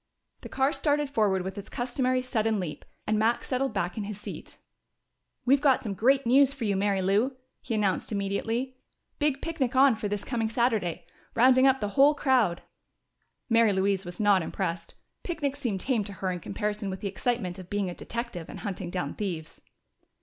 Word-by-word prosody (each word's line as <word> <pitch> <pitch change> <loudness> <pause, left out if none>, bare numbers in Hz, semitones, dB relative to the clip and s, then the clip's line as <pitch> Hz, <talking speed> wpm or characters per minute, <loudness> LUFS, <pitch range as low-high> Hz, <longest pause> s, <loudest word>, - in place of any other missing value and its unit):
The - - -9
car 270 +2 +1
started 290 -2 0
forward 205 -8 +2
with 190 +2 -5
its 200 - -9
customary 255 +1 0
sudden 225 -4 0
leap, 175 -5 -5 0.2
and 215 0 +1
Max 230 +2 +1
settled 265 0 0
back 190 -1 -2
in 205 - -3
his 210 0 -6
seat. - - -8 0.9
"We've 275 +2 +4
got 275 -3 +3
some 210 - -3
great 265 +7 +3
news 270 +3 +5
for 260 -5 -4
you, 200 -2 +1
Mary 195 -1 +1
Lou," 215 +8 +1 0.2
he 230 - -3
announced 205 -1 0
immediately. 225 +6 -2 0.4
"Big 290 -3 0
picnic 285 -6 -1
on 265 -2 +6
for 215 -1 -3
this 205 0 -3
coming 230 -3 -1
Saturday! 225 -7 0 0.3
Rounding 260 +2 +6
up 265 -2 +3
the 205 - -1
whole 275 +8 +5
crowd." 250 -12 +2 0.8
Mary 230 -3 +4
Louise 195 0 +1
was 175 -1 -9
not 205 -3 +4
impressed. 170 -1 -4 0.3
Picnics 290 -5 -3
seemed 215 -9 -2
tame 245 -5 +1
to 200 - -7
her 185 +1 -2
in 180 - -4
comparison 210 +3 -3
with 190 0 -5
the 205 - -2
excitement 195 -2 -2
of 185 -1 -11
being 205 -2 -1
a 180 - -4
detective 235 -5 -5
and - - -8
hunting 190 -3 -4
down 175 -6 -3
thieves. 170 -6 -5
220 Hz, 185 wpm, -28 LUFS, 195-255 Hz, 0.9 s, on